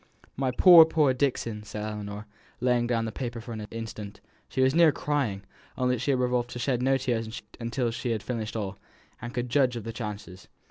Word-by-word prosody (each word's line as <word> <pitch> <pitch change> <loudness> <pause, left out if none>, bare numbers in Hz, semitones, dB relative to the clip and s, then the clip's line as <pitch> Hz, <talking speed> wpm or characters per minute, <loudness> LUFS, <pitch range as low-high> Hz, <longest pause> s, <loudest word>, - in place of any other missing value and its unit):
"My 135 0 0
poor, 170 +6 +9
poor 155 -4 +2
Dixon!" 125 -5 -1
said 105 0 -6
Ellinor, 105 -1 -5 0.3
laying 125 -1 +2
down 115 -2 0
the 110 - -3
paper 120 -1 -5
for 115 +1 -8
an 110 -1 -6
instant, 110 -2 -7
and - - -35 0.2
she 130 - -1
was 130 +1 +4
near 165 -1 +6
crying, 135 -11 -1 0.3
only 125 -1 +1
she 130 - -2
had 135 -2 +2
resolved 125 -1 0
to 125 - -7
shed 125 0 0
no 135 +1 +3
tears 120 -3 -3 0.3
till 120 -1 -1
she 125 +1 -4
had 110 -3 -1
finished 115 -3 -4
all, 100 -3 -4 0.4
and 120 +1 -5
could 120 0 -3
judge 130 -3 +3
of 115 - -5
the 115 - -6
chances. 105 -5 -7
120 Hz, 205 wpm, -27 LUFS, 110-130 Hz, 0.4 s, poor